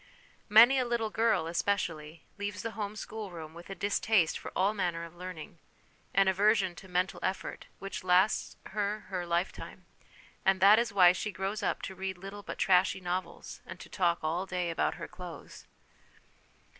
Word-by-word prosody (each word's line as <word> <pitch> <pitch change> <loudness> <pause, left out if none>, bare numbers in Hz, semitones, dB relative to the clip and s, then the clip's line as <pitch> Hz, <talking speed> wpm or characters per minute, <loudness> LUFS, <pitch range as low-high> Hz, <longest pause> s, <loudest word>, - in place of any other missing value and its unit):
Many 235 +5 +8
a 255 - +1
little 235 -2 -1
girl, 215 -7 +2
especially, 165 -3 -2 0.2
leaves 205 0 -4
the 230 - -3
home 210 -2 -4
schoolroom 185 -7 -7
with 170 +2 -12
a 195 - -5
distaste 200 -3 +2
for - - -8
all 195 +3 +2
manner 175 -5 -2
of 170 0 -9
learning, 175 -2 -8 0.6
an 195 0 +5
aversion 195 -1 +3
to 190 - -11
mental 180 +1 -1
effort, 190 +1 -3
which 195 -1 -6
lasts 185 +3 +3 0.2
her 210 +1 -1
her 180 -3 -3
life 170 +2 +1
time, - - -11 0.6
and 190 0 +3
that 205 +3 +7
is 235 -2 0
why 185 -3 +7
she 210 +3 -3
grows 195 +3 -3
up 195 - -1
to - - -4
read 190 0 -4
little 195 +3 -8
but - - -7
trashy 190 0 +3
novels, 180 +1 -5
and - - -10
to - - -11
talk 175 -3 +1
all 170 +5 -1
day 180 -2 -2
about 165 - 0
her - - -7
clothes. 180 -1 -10
190 Hz, 175 wpm, -30 LUFS, 175-205 Hz, 0.6 s, Many